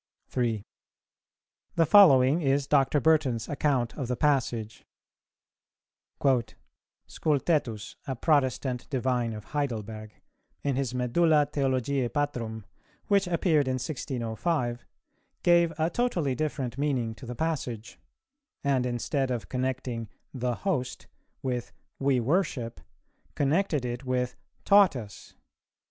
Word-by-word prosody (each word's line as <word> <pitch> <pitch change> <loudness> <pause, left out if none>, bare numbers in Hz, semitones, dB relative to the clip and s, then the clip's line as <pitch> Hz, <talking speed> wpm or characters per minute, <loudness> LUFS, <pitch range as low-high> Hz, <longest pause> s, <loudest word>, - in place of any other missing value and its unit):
3. 115 -5 -1 1.1
The 165 - +4
following 145 -5 +7
is 140 -1 +2
Dr. 145 0 +3
Burton's 140 -8 +2
account 135 -5 0
of 135 -5 -4
the 125 - -1
passage: 120 -6 0 2.2
"Scultetus, 140 -8 -1
a 135 - -2
Protestant 130 -3 0
divine 125 -4 0
of 105 -1 -7
Heidelberg, 110 -6 -4 0.5
in 140 -2 0
his 130 -2 -2
Medulla 150 +5 +3
Theologiæ 135 -2 0
Patrum, 115 -7 -2 0.4
which 200 -2 +3
appeared 165 -4 +2
in 130 - 0
1605, 125 -1 -2 0.6
gave 170 -1 +5
a 160 +2 +1
totally 180 - 0
different 135 -2 -3
meaning 130 -6 0
to 125 +2 -11
the 125 - -5
passage; 125 -8 -3 0.6
and 135 -3 +1
instead 130 +3 -1
of 120 -3 -3
connecting 125 -3 -3 0.2
'the 125 -2 -1
host' 135 -9 -2 0.4
with 125 -2 -2 0.3
'we 135 -2 +2
worship,' 130 -3 -1 0.5
connected 150 -1 +1
it 120 +1 -4
with 125 -1 -1 0.3
'taught 200 -5 +6
us.' 105 -5 -9
130 Hz, 110 wpm, -28 LUFS, 120-150 Hz, 2.2 s, following